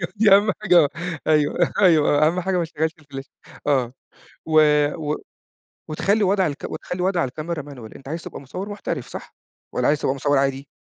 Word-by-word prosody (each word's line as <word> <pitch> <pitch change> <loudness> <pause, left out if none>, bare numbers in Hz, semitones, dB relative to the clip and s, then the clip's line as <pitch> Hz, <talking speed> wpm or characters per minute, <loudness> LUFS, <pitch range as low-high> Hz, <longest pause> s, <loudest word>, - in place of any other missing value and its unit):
أيوه 170 +1 -5
دي 210 -1 +6
أهم 210 +1 +4
حاجة 175 -7 +5 0.4
أيوه، 155 +2 +2
أيوه 155 -4 +4
أهم 175 +3 +1
حاجة 190 +1 -1
ما 170 - 0
تشغلش 160 0 -2
الفلاش، 140 -3 -9 0.4
آه، 130 -4 +1 0.5
و 155 -1 +5 0.5
و 150 - 0 0.7
وتخلّي 200 +7 +1
وضع 190 -1 +2
الك 145 -1 -5
وتخلّي 180 0 -5
وضع 180 -3 +1
الكاميرا 155 +4 -5
manual 130 -6 -11
أنت 135 - -13
عايز 165 +3 -5
تبقى - - -9
مصوّر 185 +9 -7
محترف 170 - -5
صح؟ - - -9 0.4
والّا - - +1
عايز 150 0 +2
تبقى 130 - 0
مصوّر 145 +1 +1
عادي؟ 135 0 -1
155 Hz, 175 wpm, -22 LUFS, 140-180 Hz, 0.7 s, دي